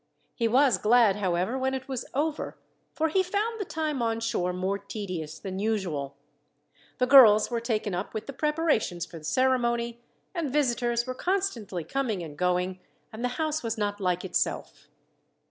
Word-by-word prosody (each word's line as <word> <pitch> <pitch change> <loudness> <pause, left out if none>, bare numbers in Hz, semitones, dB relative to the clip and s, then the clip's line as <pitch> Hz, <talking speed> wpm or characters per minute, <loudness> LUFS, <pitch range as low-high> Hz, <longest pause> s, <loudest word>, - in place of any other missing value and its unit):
He 230 - 0
was 250 -3 +4
glad, 220 -2 +4
however, 190 +5 0
when 265 0 0
it 260 0 -6
was 265 -3 -4
over, 300 +2 -2 0.3
for 320 0 0
he 375 +5 +3
found 415 +5 -1
the - - -2
time 310 -5 -2
on 225 -1 0
shore 180 -6 -1
more 190 +2 -2
tedious 185 -7 -5
than 190 +1 -5
usual. 185 -10 -2 0.8
The 250 - +2
girls 245 -5 +8
were 235 - 0
taken 215 -4 -1
up 180 +5 -4
with 215 - -3
the 275 - -7
preparations 300 - 0
for 170 - -10
the - - -17
ceremony, 235 +2 +1 0.3
and 330 -7 -2
visitors 240 -4 +1
were 255 - -3
constantly 255 - -2
coming 230 - -2
and 155 -3 -8
going, 180 +2 0 0.3
and 220 +2 -6
the - - +2
house 310 -1 0
was 230 -1 -3
not 205 -1 -2
like 180 -1 0
itself. 185 - -2
230 Hz, 170 wpm, -27 LUFS, 190-265 Hz, 0.8 s, girls